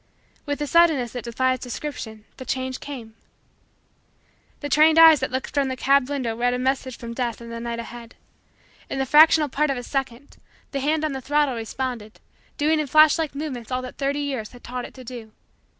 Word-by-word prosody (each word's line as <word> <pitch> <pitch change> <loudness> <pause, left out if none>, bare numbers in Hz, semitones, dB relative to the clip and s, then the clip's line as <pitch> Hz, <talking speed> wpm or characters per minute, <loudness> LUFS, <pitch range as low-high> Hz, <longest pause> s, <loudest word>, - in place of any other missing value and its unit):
With 285 0 -2
a - - -1
suddenness 310 -7 +3
that 245 -2 -6
defies 255 +2 0
description, 235 -4 -6
the 260 - -7
change 260 0 -3
came. 240 -6 -8 1.5
The 290 - -3
trained 310 +3 +5
eyes 325 -2 +9
that 260 - -2
looked 260 0 -4
from 280 -2 +1
the 260 - -3
cab 275 0 +2
window 255 -6 -2
read 245 +1 +1
a - - -1
message 260 -1 -1
from 235 -1 -7
Death 235 -2 -3
in 235 0 -10
the 230 - -5
night 235 0 -4
ahead. 235 0 -9 0.7
In - - -3
the 270 - 0
fractional 305 +2 +6
part 295 +2 0
of 275 - -1
a 245 - -5
second, 270 0 -4 0.3
the 275 - -2
hand 305 +3 0
on 305 - -1
the 265 -1 -5
throttle 290 0 +1
responded, 230 -1 -5 0.4
doing 310 +2 +2
in 300 - -1
flash 310 +3 +6
like 315 -3 -2
movements 275 -6 -5
all 255 0 -1
that 255 - -9
the - - -4
thirty 285 +1 0
years 265 -7 -4
had 245 - -14
taught 250 0 -5
it - - -13
to 260 - -11
do. 235 -3 -9
260 Hz, 210 wpm, -23 LUFS, 240-290 Hz, 1.5 s, eyes